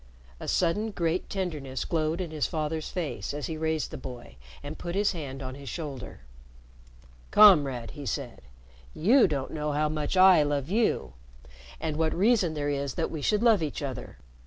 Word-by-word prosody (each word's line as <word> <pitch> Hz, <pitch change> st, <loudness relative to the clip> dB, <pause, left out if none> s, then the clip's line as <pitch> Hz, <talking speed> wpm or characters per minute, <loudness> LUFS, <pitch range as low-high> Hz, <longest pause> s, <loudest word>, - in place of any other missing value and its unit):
A -, -, -7 dB
sudden 195 Hz, +5 st, +1 dB
great 170 Hz, -3 st, -1 dB
tenderness 150 Hz, -9 st, -3 dB
glowed 160 Hz, +1 st, -1 dB
in 170 Hz, -3 st, -4 dB
his 150 Hz, -7 st, -1 dB
father's 155 Hz, 0 st, -3 dB
face 145 Hz, -, -4 dB
as 145 Hz, -, -4 dB
he 160 Hz, -, -4 dB
raised 160 Hz, -1 st, -1 dB
the -, -, -6 dB
boy 120 Hz, -, -9 dB, 0.3 s
and 145 Hz, +2 st, -7 dB
put 175 Hz, 0 st, -5 dB
his 205 Hz, +1 st, +2 dB
hand 140 Hz, -6 st, -6 dB
on 130 Hz, 0 st, -5 dB
his 140 Hz, -1 st, -9 dB
shoulder. 140 Hz, -, -6 dB, 1.1 s
"Comrade," 145 Hz, -, +6 dB
he 145 Hz, -3 st, -8 dB
said, -, -, -4 dB, 0.5 s
"you 235 Hz, -, +5 dB
don't 140 Hz, -5 st, -3 dB
know 150 Hz, -1 st, -2 dB
how 150 Hz, +1 st, +1 dB
much 150 Hz, +3 st, -2 dB
I 185 Hz, -3 st, +8 dB
love 145 Hz, -1 st, -1 dB
you 215 Hz, -, +1 dB, 0.7 s
and 155 Hz, -2 st, -3 dB
what 160 Hz, -1 st, +1 dB
reason 195 Hz, -4 st, +3 dB
there 145 Hz, -1 st, -1 dB
is 140 Hz, -2 st, -2 dB
that 165 Hz, -, -1 dB
we 155 Hz, -, -4 dB
should 210 Hz, +7 st, +1 dB
love 225 Hz, -6 st, +5 dB
each 150 Hz, -1 st, -3 dB
other! 130 Hz, -3 st, -6 dB
155 Hz, 180 wpm, -28 LUFS, 140-180 Hz, 1.1 s, I